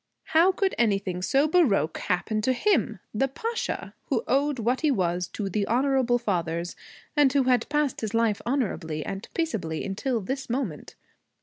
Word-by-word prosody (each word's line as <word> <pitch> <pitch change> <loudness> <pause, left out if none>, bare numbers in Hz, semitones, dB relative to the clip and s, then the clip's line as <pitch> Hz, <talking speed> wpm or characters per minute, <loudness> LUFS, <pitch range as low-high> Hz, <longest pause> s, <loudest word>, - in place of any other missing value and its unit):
How 335 +4 +6
could 380 +1 0
anything 195 -5 +1
so 275 +10 +3
baroque 295 - +2
happen 200 +5 -1
to 255 +4 +2
him, 255 - +1
the 270 +6 +1
Pasha, 455 - -4
who - - 0
owed 285 +1 +2
what 240 +3 0
he 310 - +3
was 180 -7 0
to 205 - -3
the 200 +1 -1
honorable 255 0 +2
fathers 175 -6 -2 0.4
and 290 -3 +5
who 275 0 +3
had 250 -2 +2
passed 295 -2 0
his 220 0 -3
life 225 -3 +2
honorably 190 - -2
and 195 0 -5
peaceably 190 - -2
until 230 +5 -1
this 265 +7 -4
moment? 235 - -3
240 Hz, 165 wpm, -26 LUFS, 195-275 Hz, 0.4 s, How